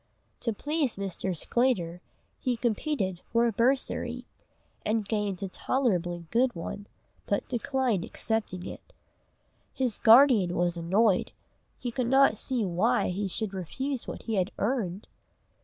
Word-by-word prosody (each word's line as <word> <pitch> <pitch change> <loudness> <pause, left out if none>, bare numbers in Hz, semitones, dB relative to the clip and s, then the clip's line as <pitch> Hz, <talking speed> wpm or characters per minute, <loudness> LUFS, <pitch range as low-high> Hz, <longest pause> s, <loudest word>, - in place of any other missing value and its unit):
To 230 - -1
please 290 +3 -1
Mr. 190 -2 -3
Sclater 180 -7 0 0.4
he 250 -2 -1
competed 220 - -1
for 235 0 +3
a 235 - +2
bursary, 250 +5 0 0.6
and 215 -1 0
gained 205 -3 -1
a - - -1
tolerably 180 -7 -1
good 245 0 +2
one, 200 +4 -6 0.4
but 200 - 0
declined 245 -5 0
accepting 210 -5 -3
it. - - -10 0.8
His 250 -5 0
guardian 225 -6 +6
was 175 0 +1
annoyed, 190 +4 +2 0.4
he 245 - -4
could 245 0 -1
not 270 -2 +5
see 250 -5 0
why 200 +8 +1
he 195 +2 -2
should 205 +2 -3
refuse 260 - -4
what - - -6
he 225 -3 -2
had 185 0 +1
"earned." 205 -5 -1
220 Hz, 135 wpm, -28 LUFS, 185-250 Hz, 0.8 s, guardian